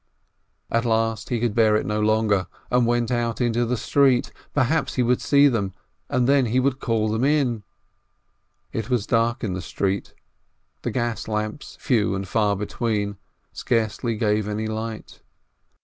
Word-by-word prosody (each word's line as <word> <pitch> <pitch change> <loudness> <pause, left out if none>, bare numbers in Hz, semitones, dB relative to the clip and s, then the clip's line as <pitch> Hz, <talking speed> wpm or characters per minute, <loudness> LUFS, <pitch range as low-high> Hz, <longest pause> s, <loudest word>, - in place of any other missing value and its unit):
At 115 0 +2
last 115 -1 0
he 120 - 0
could 120 -2 0
bear 110 -2 +4
it 110 - 0
no 105 0 -1
longer, 105 -3 +2 0.2
and 125 -1 +3
went 120 -1 +1
out 120 -1 -1
into 120 -1 +1
the 125 +1 0
street; 135 0 +2 0.2
perhaps 145 +4 +1
he 125 - +2
would 125 +1 +1
see 145 0 +5
them, 100 -7 -1 0.3
and 125 -1 +1
then 140 -2 +4
he 120 +4 +2
would 135 0 +1
call 115 -4 0
them 110 +3 0
in. 135 -6 +2 1.1
It 115 +1 -3
was 120 -5 +1
dark 115 +2 +1
in 100 -4 -1
the 90 - -4
street; 95 +3 -2 0.7
the - - -2
gas 120 -2 -2
lamps, 110 +4 -4
few 105 -6 +1
and 95 0 -4
far 105 -2 +1
between, 105 0 -2 0.4
scarcely 115 0 -1
gave 105 -1 +1
any 105 +1 -2
light. 110 0 -5
115 Hz, 165 wpm, -23 LUFS, 105-120 Hz, 1.1 s, see